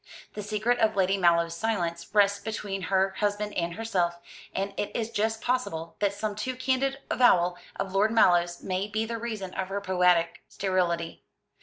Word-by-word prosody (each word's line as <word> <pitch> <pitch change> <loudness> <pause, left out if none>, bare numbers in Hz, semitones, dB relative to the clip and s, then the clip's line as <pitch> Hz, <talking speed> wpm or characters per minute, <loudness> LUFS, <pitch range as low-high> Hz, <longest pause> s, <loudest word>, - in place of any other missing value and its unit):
The 210 - -5
secret 215 +4 0
of 220 -1 +2
Lady 195 0 +2
Mallow's 170 -3 +3
silence 170 -5 -2
rests 200 -1 +4
between 200 -2 -4
her 190 0 +3
husband 205 0 -1
and 170 -1 -2
herself; 180 -6 -1 0.4
and 195 +1 -2
it 205 - -2
is 230 -1 -2
just 220 +1 -1
possible 165 -11 -2
that 205 -1 +2
some 205 +1 -3
too 255 +5 -3
candid 265 +1 0
avowal 180 -8 +4 0.2
of 195 -1 -4
Lord 200 +3 +3
Mallow's 175 -6 +3
may 185 +1 -1
be 215 +1 -1
the 230 0 -4
reason 215 -5 -5
of 190 -1 -3
her 195 +1 -3
poetic 180 -3 +2
sterility. 175 -3 -1
200 Hz, 170 wpm, -27 LUFS, 180-220 Hz, 0.4 s, rests